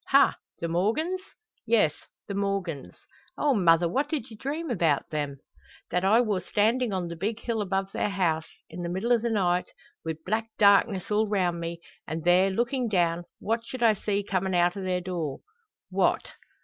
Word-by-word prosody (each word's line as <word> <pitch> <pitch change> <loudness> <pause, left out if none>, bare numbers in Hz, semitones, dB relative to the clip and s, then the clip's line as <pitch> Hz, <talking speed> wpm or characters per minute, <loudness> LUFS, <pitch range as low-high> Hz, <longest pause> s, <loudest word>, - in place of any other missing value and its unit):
"Ha! 275 0 +5 0.2
the 170 - -2
Morgans?" 230 - 0 0.4
"Yes; 220 -10 +3 0.3
the 200 - -4
Morgans." 195 -7 -2 0.4
"Oh, 290 -2 +2
mother, 170 -5 +4
what 275 - 0
did 285 -5 -3
you - - -9
dream 290 +6 -4
about 165 - +1
them?" 145 -2 -2 0.5
"That 180 - +1
I 215 +5 +5
wor 210 -6 0
standin' 225 +5 +1
on 185 -3 -2
the 170 - -6
big 210 +6 -2
hill 230 -2 -2
above 195 0 -1
their - - -1
house, 170 -5 0 0.2
in 170 +2 -8
the 170 - -3
middle 195 +7 +1
o' 235 - +4
the 235 +1 -1
night, 180 -5 +1 0.3
wi' 160 -1 -3
black 220 +3 -1
darkness 200 -1 +4
all 215 +1 +2
round 180 -4 0
me; 170 0 -5 0.3
and 160 0 -4
there 180 +2 +5
lookin' 240 +5 0
down 175 -3 +1
what 230 +2 -1
should 240 +1 -5
I 225 -2 +6
see 205 0 -1
comin' 190 -1 -1
out 175 0 +3
o' 200 - -5
their 185 -1 -1
door?" 170 -6 -4 0.5
"What?" - - +1
195 Hz, 185 wpm, -27 LUFS, 175-225 Hz, 0.5 s, I